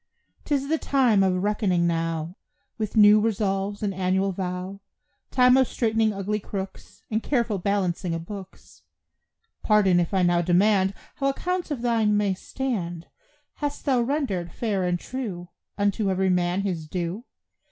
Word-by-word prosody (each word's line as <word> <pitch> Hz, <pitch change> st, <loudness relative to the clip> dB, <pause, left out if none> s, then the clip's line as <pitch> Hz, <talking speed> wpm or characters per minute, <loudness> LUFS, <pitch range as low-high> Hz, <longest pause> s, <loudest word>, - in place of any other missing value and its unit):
'Tis 275 Hz, -2 st, 0 dB
the 320 Hz, +1 st, 0 dB
time 250 Hz, -7 st, +3 dB
of 185 Hz, -1 st, +1 dB
reckoning 200 Hz, -4 st, +1 dB
now, 165 Hz, 0 st, -1 dB, 0.4 s
Of 215 Hz, 0 st, -3 dB
new 210 Hz, 0 st, +8 dB
resolves 205 Hz, -1 st, -1 dB
and 200 Hz, -2 st, 0 dB
annual 190 Hz, +1 st, 0 dB
vow; 185 Hz, +1 st, -4 dB, 0.5 s
Time 250 Hz, 0 st, +5 dB
of 260 Hz, -2 st, +4 dB
straightening 225 Hz, -2 st, +1 dB
ugly 205 Hz, +1 st, -2 dB
crooks, 195 Hz, -1 st, -7 dB
And 220 Hz, +1 st, 0 dB
careful 235 Hz, -7 st, 0 dB
balancing 180 Hz, -3 st, -1 dB
of 165 Hz, 0 st, -6 dB
books. 195 Hz, -1 st, -11 dB, 0.8 s
Pardon 200 Hz, -5 st, +4 dB
if 170 Hz, -, 0 dB
I 190 Hz, -2 st, +2 dB
now 175 Hz, -1 st, +3 dB
demand 190 Hz, +2 st, +3 dB, 0.2 s
How 275 Hz, -, 0 dB
accounts 360 Hz, +6 st, -2 dB
of 270 Hz, -6 st, -4 dB
thine 225 Hz, -3 st, +2 dB
may 205 Hz, -2 st, +1 dB
stand; 185 Hz, -7 st, -4 dB, 0.5 s
Hast 290 Hz, -1 st, -4 dB
thou 260 Hz, -4 st, +3 dB
rendered, 235 Hz, -, -1 dB
fair 200 Hz, -4 st, -1 dB
and 175 Hz, 0 st, 0 dB
true, 195 Hz, -10 st, -6 dB, 0.3 s
Unto 205 Hz, 0 st, +1 dB
every 190 Hz, 0 st, +1 dB
man 180 Hz, +1 st, +1 dB
his 175 Hz, -6 st, -3 dB
due? 180 Hz, +7 st, -4 dB
200 Hz, 150 wpm, -25 LUFS, 180-225 Hz, 0.8 s, new